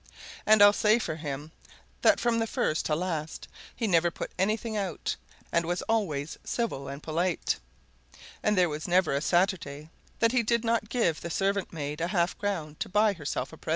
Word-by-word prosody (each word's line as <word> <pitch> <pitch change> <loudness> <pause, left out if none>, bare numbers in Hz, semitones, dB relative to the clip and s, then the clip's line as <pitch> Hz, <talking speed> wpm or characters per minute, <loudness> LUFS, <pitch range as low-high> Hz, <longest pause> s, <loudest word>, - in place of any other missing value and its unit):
And 215 -1 +7
I'll 205 0 +8
say 215 +1 +4
for 160 -9 -3
him 150 0 -5 0.5
that - - +5
from 230 -1 +2
first 155 -6 0
to 150 - +1
last 160 -2 -3 0.3
he 230 - -2
never 175 -4 +3
put - - -6
anything 215 +3 0
out, 195 -5 -2 0.4
and 170 - +2
was 175 +2 -2
always 165 -10 -1
civil 225 - -2
and 140 +2 -7
polite, 170 +2 0 0.8
and 210 -1 +1
there 180 -1 +5
was 155 0 -4
never 180 -3 +3
a 140 - 0
Saturday 165 -4 0 0.3
that 230 -1 +3
he 250 -1 +3
did 235 +1 +1
not 230 -2 +1
give 200 -11 +1
the 170 - -5
servant 195 +3 0
maid 150 -1 -4
a 170 - +1
half 175 -2 +1
crown 165 -7 -3
to - - -3
buy 210 +2 +3
herself 155 -6 -4
a - - -10
present. - - -9
180 Hz, 190 wpm, -28 LUFS, 155-210 Hz, 0.8 s, I'll